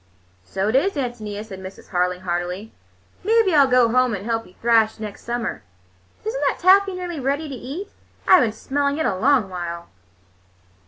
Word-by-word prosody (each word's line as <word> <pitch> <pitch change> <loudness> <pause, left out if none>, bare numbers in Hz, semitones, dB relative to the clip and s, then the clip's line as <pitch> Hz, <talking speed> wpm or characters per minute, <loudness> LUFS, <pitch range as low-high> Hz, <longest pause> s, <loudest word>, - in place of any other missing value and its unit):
"So 190 - -2
it 220 - 0
is, 390 +9 +3
Ántonia," 220 -6 -4
said 190 -3 -9
Mrs. 190 0 -11
Harling 180 0 0
heartily. 180 +4 -3 0.5
"Maybe 435 -2 +3
I'll 285 -3 +6
go 250 -2 +4
home 250 -1 +2
and 200 +1 -7
help 225 -1 -2
you 180 - -20
thrash 225 -2 +3
next 210 -2 -7
summer. 235 -1 -3 0.6
Is 440 - -2
n't - - -3
that - - 0
taffy 385 +1 +4
nearly 355 -3 -5
ready 280 +4 -1
to 280 - -7
eat? 280 - -6 0.4
I've 370 - +7
been 230 - +1
smelling 280 +5 -1
it 315 - 0
a 190 - +1
long 250 +1 +3
while." 170 -2 -6
235 Hz, 180 wpm, -22 LUFS, 200-290 Hz, 0.6 s, I've